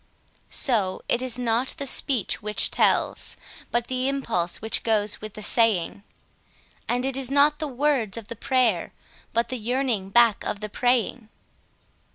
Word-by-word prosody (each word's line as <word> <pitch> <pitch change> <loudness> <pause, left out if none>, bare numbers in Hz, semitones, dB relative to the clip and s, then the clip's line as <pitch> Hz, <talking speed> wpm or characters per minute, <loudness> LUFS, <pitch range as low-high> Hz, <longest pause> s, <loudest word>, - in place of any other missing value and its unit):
So 205 -8 +1
it 240 - 0
is 255 -2 0
not 245 +1 -1
the 280 - -4
speech 255 -4 +2
which 210 0 0
tells, - - +1 0.3
but 240 0 0
the 255 +1 -1
impulse 225 -11 -2
which 220 0 0
goes 210 -2 0
with 215 -1 -8
the 215 - -6
saying; 205 -6 +3 0.9
And 245 +1 0
it 270 -1 -2
is 265 -2 -2
not 285 +2 +3
the 310 - -3
words 265 -6 -1
of 225 -3 -8
the 235 - -7
prayer, 235 -6 0 0.4
but 230 +1 0
the 255 - -4
yearning 235 -4 -1
back 235 0 +4
of 205 - -4
the 210 0 -5
praying. 245 -1 0
235 Hz, 160 wpm, -24 LUFS, 215-255 Hz, 0.9 s, back